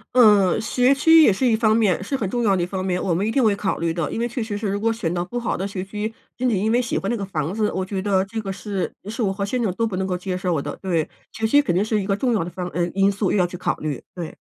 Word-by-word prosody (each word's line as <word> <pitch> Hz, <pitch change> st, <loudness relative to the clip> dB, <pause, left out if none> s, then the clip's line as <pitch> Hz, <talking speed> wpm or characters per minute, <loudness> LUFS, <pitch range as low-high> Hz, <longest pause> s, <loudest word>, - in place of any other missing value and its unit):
嗯， 210 Hz, -7 st, +6 dB
学 250 Hz, +3 st, +2 dB
区 325 Hz, +3 st, +6 dB
也 260 Hz, -, +6 dB
是 225 Hz, +7 st, 0 dB
一 230 Hz, -3 st, +4 dB
方 220 Hz, -1 st, +3 dB
面， 195 Hz, -5 st, +2 dB
是 250 Hz, +8 st, -2 dB
很 215 Hz, -, -2 dB
重 240 Hz, -, 0 dB
要 200 Hz, -3 st, +3 dB
的 175 Hz, -, 0 dB
一 -, -, +1 dB
方 185 Hz, +1 st, -4 dB
面， 180 Hz, -1 st, -1 dB
我 185 Hz, -, 0 dB
们 185 Hz, +5 st, 0 dB
一 -, -, 0 dB
定 260 Hz, +2 st, +2 dB
会 210 Hz, -2 st, +3 dB
考 200 Hz, -1 st, -1 dB
虑 165 Hz, -1 st, -1 dB
的。 165 Hz, -4 st, -2 dB
因 -, -, -3 dB
为 235 Hz, -, 0 dB
确 240 Hz, +1 st, -4 dB
实 220 Hz, -2 st, -3 dB
是 210 Hz, 0 st, -3 dB
如 200 Hz, +1 st, -1 dB
果 230 Hz, -, +2 dB
选 200 Hz, -7 st, -2 dB
到 175 Hz, 0 st, -1 dB
不 245 Hz, +7 st, -4 dB
好 235 Hz, -, -1 dB
的 190 Hz, -, -2 dB
学 195 Hz, -2 st, -5 dB
区， 210 Hz, +2 st, -4 dB, 0.2 s
仅 255 Hz, 0 st, 0 dB
仅 215 Hz, -, +1 dB
因 210 Hz, +4 st, +1 dB
为 245 Hz, +2 st, +3 dB
喜 235 Hz, -, -2 dB
欢 195 Hz, -, -2 dB
那 -, -, +1 dB
个 205 Hz, -, -4 dB
房 165 Hz, -4 st, -3 dB
子， 210 Hz, 0 st, 0 dB
我 190 Hz, -, -2 dB
觉 190 Hz, 0 st, -3 dB
得 190 Hz, -1 st, +1 dB
这 220 Hz, +3 st, -5 dB
个 195 Hz, -2 st, -4 dB
是 195 Hz, -1 st, -3 dB, 0.2 s
是 225 Hz, +3 st, -4 dB
我 195 Hz, -4 st, +1 dB
和 200 Hz, +1 st, -2 dB
先 245 Hz, +5 st, -2 dB
生 215 Hz, -5 st, +1 dB
都 230 Hz, -, 0 dB
不 215 Hz, -4 st, -3 dB
能 190 Hz, 0 st, -1 dB
够 180 Hz, -1 st, -1 dB
接 185 Hz, 0 st, -4 dB
受 180 Hz, -4 st, -1 dB
的， 145 Hz, +1 st, -5 dB
对， 170 Hz, -5 st, 0 dB, 0.3 s
学 225 Hz, -, -2 dB
区 285 Hz, +6 st, +5 dB
肯 225 Hz, -12 st, -1 dB
定 195 Hz, +3 st, +2 dB
是 215 Hz, -1 st, 0 dB
一 195 Hz, -, -5 dB
个 195 Hz, -1 st, +1 dB
重 245 Hz, +2 st, +1 dB
要 205 Hz, -7 st, +1 dB
的 175 Hz, -, -5 dB
方 180 Hz, 0 st, -5 dB
呃， 175 Hz, 0 st, -1 dB
因 195 Hz, 0 st, +4 dB
素， 200 Hz, -1 st, -1 dB
又 -, -, +2 dB
要 180 Hz, -, +3 dB
去 175 Hz, 0 st, -6 dB
考 175 Hz, -, -1 dB
虑， 150 Hz, -4 st, -4 dB
对。 170 Hz, -3 st, -6 dB
200 Hz, 360 characters per minute, -22 LUFS, 185-225 Hz, 0.3 s, 嗯